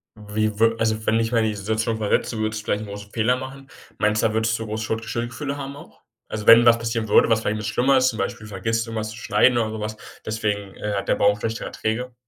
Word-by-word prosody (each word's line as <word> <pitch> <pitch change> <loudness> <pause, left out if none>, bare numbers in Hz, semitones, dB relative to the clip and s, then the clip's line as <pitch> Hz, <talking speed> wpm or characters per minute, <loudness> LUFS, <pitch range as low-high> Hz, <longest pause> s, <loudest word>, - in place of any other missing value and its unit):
wie 105 0 -2
wür 115 0 +4
also 110 -1 0
wenn 110 - +2
du - - +3
dich 115 0 -1
mal 120 - +3
in 110 - +2
die 110 -1 -1
Situation 110 +3 -1
versetzen 110 +1 0
würdest, 110 0 -2
vielleicht 105 +1 -1
'n - - -7
großen 100 0 -9
Fehler 120 +2 +2
machen, 135 +1 -9 0.3
meinst 105 +1 +1
du, - - +5
da 110 - -4
würdest 110 0 +1
du 115 - -4
groß 110 0 -4
Schuld 110 +1 -3
Schuldgefühle 120 +5 -4
haben 140 0 -6
auch? 70 - -15 0.3
Also 105 -1 -6
wenn 115 +1 +9
was 120 -1 +7
passieren 115 -1 -2
würde, 105 - +5
was 110 -1 +3
vielleicht 110 -1 -1
was 105 - -5
'n - - -2
bisschen - - -3
schlimmer 135 +2 +3
ist, 130 0 +4
zum 110 - -6
Beispiel 105 +2 -3
vergisst 115 +3 -2
du - - -10
irgendwas 110 -1 -3
zu 110 - -10
schneiden 120 +1 +3
oder 110 -2 0
so 110 - -5
was, 105 0 -4 0.3
deswegen, 105 -2 -2
äh, 105 -1 -4
hat 100 - -3
der - - +3
Baum 105 0 +3
schlechtere 115 +2 -3
Erträge. 120 +3 -3
110 Hz, 275 wpm, -23 LUFS, 105-115 Hz, 0.3 s, wenn